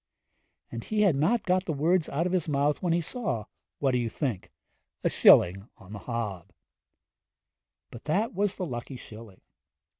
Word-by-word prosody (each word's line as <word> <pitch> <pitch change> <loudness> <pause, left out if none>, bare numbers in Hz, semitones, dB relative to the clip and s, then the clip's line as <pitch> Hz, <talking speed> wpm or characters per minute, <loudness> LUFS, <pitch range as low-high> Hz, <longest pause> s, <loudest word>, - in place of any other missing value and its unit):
And 115 - -6
he 215 -1 -1
had 195 -8 +4
not 200 +12 +1
got 185 0 +1
the 160 - -2
words 165 +4 +1
out 160 +5 -1
of 180 - -1
his 180 -3 0
mouth 145 +1 +1
when 175 - 0
he 170 +1 +2
saw 160 - -3 0.3
what 135 -2 +1
do 125 - +1
you 120 -1 -1
think? 120 - -3 0.5
a - - +1
shilling 95 +5 +5
on 95 +2 -13
the 105 - -6
hob! 105 -8 -5 1.4
But 120 - -11
that 200 +9 0
was 200 +1 0
the 185 - -3
lucky 125 -2 -6
shilling. 110 -4 -12
145 Hz, 175 wpm, -28 LUFS, 115-180 Hz, 1.4 s, shilling